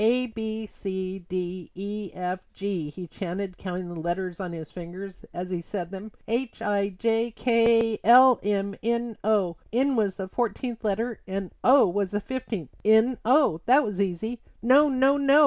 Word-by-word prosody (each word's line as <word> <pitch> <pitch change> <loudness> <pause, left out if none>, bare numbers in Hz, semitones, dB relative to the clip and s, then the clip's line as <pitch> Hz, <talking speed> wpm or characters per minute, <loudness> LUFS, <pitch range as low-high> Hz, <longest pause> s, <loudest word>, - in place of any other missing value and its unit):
"A, 245 +3 +3
B, 220 -1 -4
C, 190 -2 -5
D, 180 -1 -4
E, 200 +1 -5
F, 180 0 -2 0.2
G," 190 -6 -3
he 175 +5 -8
chanted, 185 +2 -5
counting 180 -1 -4
the 175 -1 -7
letters 175 +1 -3
on 185 -3 -4
his 160 -2 -8
fingers 180 +2 -9
as 180 +1 -5
he 175 -2 -2
said 175 0 -5
them, 200 +3 -7 0.2
"H, 235 +2 -2
I, 200 -1 0
J, 225 +4 0
K, 230 -1 +3
L, 250 +1 +8
M, 200 0 -1
N, 235 0 -1
O:" 200 -5 +2
N 265 +4 +2
was 205 -5 +1
the 190 - -5
fourteenth 235 +2 -3
letter 220 +2 -1
and 190 -1 -4
O 265 -3 +7
was 195 +1 0
the 205 - -1
fifteenth. 215 - -5
N 220 +4 +4
O; 250 - +4
that 265 +5 +6
was 205 -2 -2
easy. 210 +5 -2 0.2
"No! 280 +5 +6
No! 270 +1 +3
No!" 280 +1 +5
205 Hz, 175 wpm, -26 LUFS, 185-235 Hz, 0.2 s, L